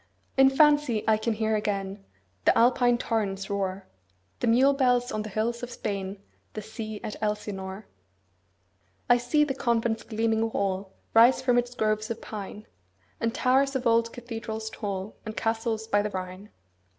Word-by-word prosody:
In 270 0 +7
fancy 290 -5 +4
I 220 - +5
can 220 +1 -1
hear 220 0 0
again 200 -2 -2 0.4
The - - +5
Alpine 245 0 +4
torrent's 200 -5 -2
roar, 195 -1 -2 0.5
The - - -1
mule 260 +5 +5
bells 250 -3 +2
on 215 - -2
the 215 - -6
hills 230 +4 -1
of 245 - -5
Spain, 200 -4 -4
15 200 - -27 0.3
The 215 - -5
sea 220 0 -7
at 210 - -4
Elsinore. 205 -2 -3 1.2
I 245 - +6
see 245 +5 +2
the 290 -2 -1
convent's 235 -3 0
gleaming 225 0 0
wall 195 -1 -2 0.2
Rise 235 +3 +7
from 245 -2 +4
its 245 0 -4
groves 215 -1 0
of 230 - -3
pine, 210 0 -7 0.5
And 230 - 0
towers 275 0 +2
of 260 -1 -2
old 230 0 +3
cathedrals 225 -2 -6
tall, 200 -1 -5
And 220 0 -7
castles 225 0 -1
by 205 -2 +2
the 210 - -2
Rhine. 185 +1 -6
220 Hz, 165 wpm, -27 LUFS, 205-240 Hz, 1.2 s, In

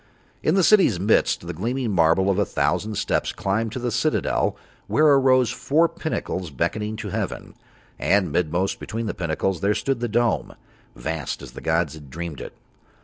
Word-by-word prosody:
In 155 - +2
the 190 - +4
city's 185 - +5
midst 100 -3 +2
the 85 - -4
gleaming 120 +7 -2
marble 90 +2 +3
of 95 - 0
a - - +4
thousand 105 +2 -1
steps - - 0
climbed 110 +3 -1
to - - -4
the 120 -1 -2
citadel - - 0 0.3
where 155 - +3
arose 130 -4 +5
four 155 +7 +2
pinnacles 155 - -4
beckoning 105 - -2
to 110 - -6
heaven, - - -4 0.5
and 100 -2 +2
midmost 90 +3 0
between 115 +2 -4
the 105 - -2
pinnacles 90 +2 -2
there 100 +1 +2
stood 135 -3 -1
the 120 - -1
dome, 120 +1 0 0.4
vast, 75 +3 -4
as - - -9
the - - -10
gods 80 -2 0
had 75 -3 -12
dreamed 80 0 -6
it. - - -8
105 Hz, 175 wpm, -23 LUFS, 85-120 Hz, 0.5 s, city's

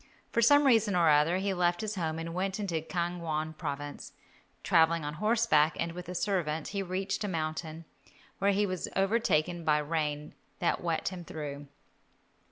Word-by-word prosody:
For 235 - +2
some 285 +5 +6
reason 225 -6 +4
or 170 -3 +5
other 150 +4 +4
he 195 +1 -1
left 175 +1 +1
his 215 -1 -3
home 160 -5 -2
and 165 0 -5
went 190 +3 -2
into 175 -6 -2
Kang 175 +1 -3
won 155 -1 -2
Province. 145 -1 -6 0.5
Travelling 165 -1 +3
on 150 - -3
horseback, 190 -5 +2
and 165 - -1
with 175 +1 -8
a 180 - -5
servant, 165 -6 -1
he 200 -1 -2
reached 195 +2 -2
a - - -1
mountain, 160 -1 -4 0.5
where 200 - +3
he 205 +1 +2
was 185 -3 -3
overtaken 180 -5 +1
by 155 -1 +3
rain 150 -1 -2 0.2
that 175 - 0
wet 165 -2 -1
him 185 -2 -8
through. 145 -3 -7
170 Hz, 175 wpm, -30 LUFS, 155-195 Hz, 0.5 s, some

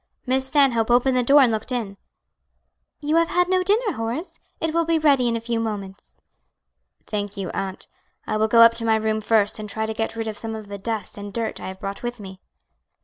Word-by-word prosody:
Miss 265 +1 +1
Stanhope 260 -6 +3
opened 250 +2 +3
the 250 - +3
door 280 +4 +6
and 245 - +3
looked 220 +3 -3
in. 225 -6 -3 1.1
"You 305 +2 +1
have 335 0 +3
had 355 +1 +1
no 370 0 +3
dinner, 415 +2 +1
Horace. 235 +10 -4 0.2
It 320 -1 -1
will 335 0 +2
be 330 0 +1
ready 280 -5 +3
in 230 - 0
a - - -1
few 230 0 -2
moments." 205 -4 -6 0.9
"Thank 205 -1 -4
you, 190 -3 -4
aunt. 190 -1 -5 0.4
I - - -2
will 215 +1 +2
go 230 +1 +5
up 230 0 +8
to - - -3
my 225 -1 +3
room 220 0 0
first 215 0 +2
and 210 -1 -6
try 220 +1 -2
to 220 - -3
get 225 0 -2
rid 225 0 -3
of 215 -1 -4
some 225 -1 -5
of 215 -2 -9
the 200 0 -6
dust 215 -1 -4
and 205 0 -7
dirt 225 +1 -3
I - - -7
have 190 0 -8
brought 195 0 -5
with 240 -1 -5
me." 190 -2 -10
225 Hz, 230 wpm, -23 LUFS, 210-265 Hz, 1.1 s, up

